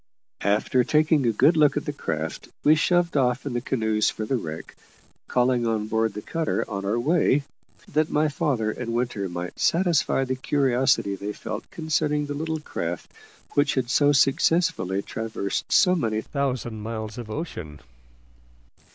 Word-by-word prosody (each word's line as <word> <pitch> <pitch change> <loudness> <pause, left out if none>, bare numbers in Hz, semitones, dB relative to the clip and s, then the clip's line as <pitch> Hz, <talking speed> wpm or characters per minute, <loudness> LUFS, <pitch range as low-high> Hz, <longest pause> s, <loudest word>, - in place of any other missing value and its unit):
After 105 +5 +2
taking 150 -1 +3
a - - +4
good 140 +10 +4
look 150 -2 +4
at 145 - -2
the 145 - -3
craft, 80 - -4 0.2
we 150 - +6
shoved 175 +2 +2
off 125 -2 +1
in - - -3
the 120 - -1
canoes 110 -4 +1
for 110 - -4
the 130 - 0
wreck, 80 -9 -6 0.5
calling 125 -1 +2
on 110 -2 0
board 110 -1 0
the 105 - -6
cutter 165 -1 -1
on 100 0 -4
our 105 +4 0
way, 145 +1 +2 0.4
that 155 +1 +1
my 150 +1 +2
father 140 -8 0
and 115 0 -4
Winter 120 -6 -1
might 90 0 -6
satisfy 170 -6 +2
the 130 - -1
curiosity 130 -6 +1
they 100 +2 -5
felt 110 0 -6
concerning 150 -2 0
the 145 - -4
little 160 +2 -3
craft 85 - -5 0.4
which 145 0 +2
had 125 -2 -1
so 145 +1 +4
successfully 140 - +2
traversed 110 -3 -4
so 180 -2 +5
many 110 -11 0
thousand 125 -5 -3
miles 110 0 -5
of 115 -3 -7
ocean. 90 - -6
125 Hz, 160 wpm, -25 LUFS, 110-150 Hz, 0.5 s, we